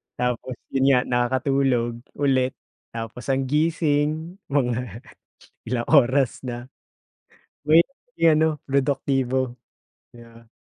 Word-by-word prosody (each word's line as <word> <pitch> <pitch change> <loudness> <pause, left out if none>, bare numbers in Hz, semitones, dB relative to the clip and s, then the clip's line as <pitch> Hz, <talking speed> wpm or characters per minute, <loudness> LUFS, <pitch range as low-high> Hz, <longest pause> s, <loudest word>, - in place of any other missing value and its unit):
Tapos, 125 0 -2 0.2
'yon 135 0 +1
nga 130 -2 +5
nakakatulog 125 -1 0 0.2
ulit, 130 -2 +1 0.4
tapos 115 +2 -6
ang 135 0 +1
gising 155 +3 0
mga 125 -4 -1 0.6
ilang 120 0 -2
oras 135 -3 +4
na. 120 +1 -6 0.9
Mahirap 165 - +4 0.2
maging 165 -1 +6
ano, 160 +1 +3 0.2
produktibo. 135 -2 0 0.6
Yeah. 115 -1 -16
130 Hz, 95 wpm, -23 LUFS, 120-145 Hz, 0.9 s, maging